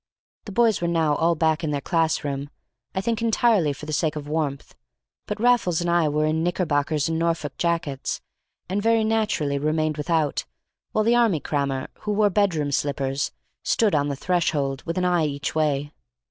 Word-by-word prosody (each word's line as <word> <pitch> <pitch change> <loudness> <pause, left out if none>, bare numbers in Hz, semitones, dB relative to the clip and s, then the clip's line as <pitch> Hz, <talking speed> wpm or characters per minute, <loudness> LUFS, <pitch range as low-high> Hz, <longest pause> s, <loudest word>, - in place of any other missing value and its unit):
The 205 - -7
boys 225 -1 +3
were 170 - 0
now 165 -3 +2
all 165 +3 +2
back 160 +1 +1
in 155 - 0
their 145 -1 -1
class 165 +1 0
room, 140 0 -3 0.5
I 190 - 0
think 225 +2 -1
entirely 225 -7 +3
for 140 +2 -8
the 155 - -5
sake 155 0 0
of 145 -1 -6
warmth; 150 -3 -3 0.5
but - - -4
Raffles 235 -8 +3
and 175 0 0
I 170 -3 +3
were 150 +1 +1
in 155 +1 +1
knickerbockers 155 -3 0
and 165 0 -1
Norfolk 165 -4 -1
jackets, 165 -6 -1 0.5
and 195 +3 -1
very 225 +1 +3
naturally 215 -11 0
remained 155 +1 0
without, 155 -1 0 0.5
while 215 - +1
the 230 +2 +3
army 225 -9 +3
crammer 140 -2 -2
(who 210 - -2
wore 205 0 +3
bedroom 170 -8 +1
slippers) 140 -1 -1 0.3
stood 215 -3 +2
on 145 -1 +2
the 140 - -2
threshold, 145 -5 0
with 165 - -2
an 180 - +1
eye 175 -3 +2
each 140 0 -3
way. 145 -2 0
160 Hz, 185 wpm, -24 LUFS, 145-185 Hz, 0.5 s, boys